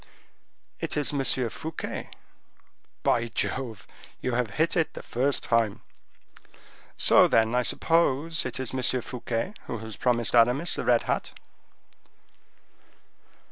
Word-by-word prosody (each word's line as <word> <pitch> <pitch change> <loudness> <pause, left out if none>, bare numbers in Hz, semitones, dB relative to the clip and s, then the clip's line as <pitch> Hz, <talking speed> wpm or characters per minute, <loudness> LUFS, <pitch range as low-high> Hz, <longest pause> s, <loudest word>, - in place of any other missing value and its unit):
"It - - -3
is 150 0 0
M. 140 -2 0 0.3
Fouquet." 160 0 -6 1.0
"Jove! 115 0 -1 0.3
you 130 - -2
have 120 -2 0
hit 160 - 0
it 165 -3 0
the - - -9
first 135 +4 -1
time." 115 -3 +1 1.2
"So, - - +6
then, 110 0 +2
I 125 - +3
suppose 165 +3 +2
it 130 - -4
is 130 -1 -4
M. 130 -1 +2
Fouquet 125 - -4
who - - -4
has 110 -1 -9
promised 120 -2 +1
Aramis 125 +8 +4
the - - -2
red 120 -1 +3
hat." - - -2
125 Hz, 120 wpm, -26 LUFS, 115-145 Hz, 1.2 s, So